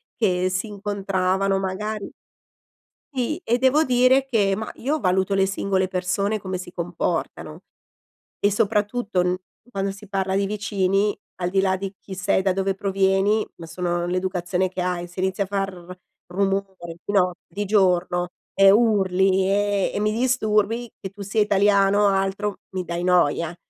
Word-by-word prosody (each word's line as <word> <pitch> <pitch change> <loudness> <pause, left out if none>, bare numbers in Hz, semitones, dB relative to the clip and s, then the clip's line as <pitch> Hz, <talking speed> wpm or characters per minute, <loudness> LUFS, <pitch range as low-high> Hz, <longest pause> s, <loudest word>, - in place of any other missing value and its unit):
che 185 -4 +1
si 185 +4 -2
incontravano 195 -1 -1
magari 200 +2 -4 1.0
Sì, 265 +5 -1
e 240 +2 +1
devo 265 +4 +4
dire 255 -1 +4
che 210 -7 +1
ma 220 +1 -5
io 295 +5 -1
valuto 190 0 +1
le 195 0 +3
singole 195 -1 0
persone 190 +3 -1
come 185 -2 -4
si 180 - -8
comportano 170 -1 -3 0.8
e 205 - +2
soprattutto 210 -1 0
n 180 0 +1 0.3
quando 195 -3 -2
si 195 +1 -11
parla 190 -1 -1
di 200 0 +1
vicini, 200 0 0 0.3
al 175 - 0
di 195 +1 +2
là 190 -1 +2
di 195 0 -5
chi 195 - -9
sei, 185 0 +1
da 190 0 +1
dove 195 0 0
provieni, 195 +2 +1
ma 165 - -9
sono 175 +1 -2
l'educazione 180 0 -1
che 185 - -5
hai, 180 -1 -2
se 175 +2 -7
inizi 190 +1 0
a - - -2
far 190 -3 -4 0.3
rumore 190 -2 -2
di - - -3
notte, 180 -3 +2
di 200 +4 -4
giorno 180 -3 +2 0.3
e 195 0 +7
urli 195 -3 +3
e 205 -1 +1
e - - -2
mi 210 0 +1
disturbi, 230 -1 +1
che 190 - -7
tu 200 +2 -16
sia 200 +2 +1
italiano 200 0 +3
o - - +6
altro, 195 +1 -1
mi 185 -1 -3
dai 170 0 -4
noia. 175 -2 +2
195 Hz, 160 wpm, -23 LUFS, 185-205 Hz, 1.0 s, e